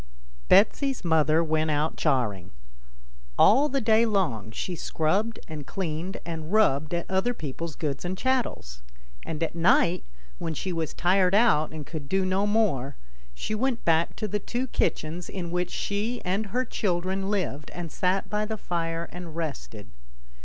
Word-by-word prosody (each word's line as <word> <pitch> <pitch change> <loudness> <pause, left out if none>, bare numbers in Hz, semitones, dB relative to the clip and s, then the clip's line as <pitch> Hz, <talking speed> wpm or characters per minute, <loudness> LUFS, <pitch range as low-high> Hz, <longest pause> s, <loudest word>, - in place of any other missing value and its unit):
BETSY'S 260 +3 +4
mother 160 0 +4
went 155 0 +1
out 150 +1 0
charing. 110 - 0 0.9
All 275 +8 +6
the 275 - 0
day 220 -1 +4
long 180 - 0
she 175 +10 -4
scrubbed 190 +9 0
and 150 -4 -7
cleaned 175 0 -3
and 160 -1 -5
rubbed 155 -7 +3
at 170 - -2
other 190 +6 0
people's 155 0 -5
goods 145 -4 -3
and 180 +1 -3
chattels, 235 - -1 0.5
and 160 0 -2
at 165 - -2
night, 170 +1 +3 0.4
when 165 -2 -3
she 185 +5 -3
was 160 -2 -3
tired 185 +1 +3
out 205 -9 +4
and 155 -2 -7
could 150 -3 -7
do 190 +1 +2
no 190 +2 +1
more, 165 - +1 0.4
she 215 - -3
went 240 +2 -1
back 165 0 +2
to 215 - -3
the 210 +1 -1
two 245 +5 -2
kitchens 170 -8 -1
in 175 -3 -5
which 180 0 -1
she 215 +4 -2
and 195 +4 0
her 250 +6 -1
children 190 -2 -1
lived, 170 -8 -2
and 170 -3 -6
sat 185 +1 0
by 210 0 -1
the 220 +1 -3
fire 165 -3 -2
and 175 -3 -8
rested. 140 -10 -5
175 Hz, 160 wpm, -27 LUFS, 155-205 Hz, 0.9 s, All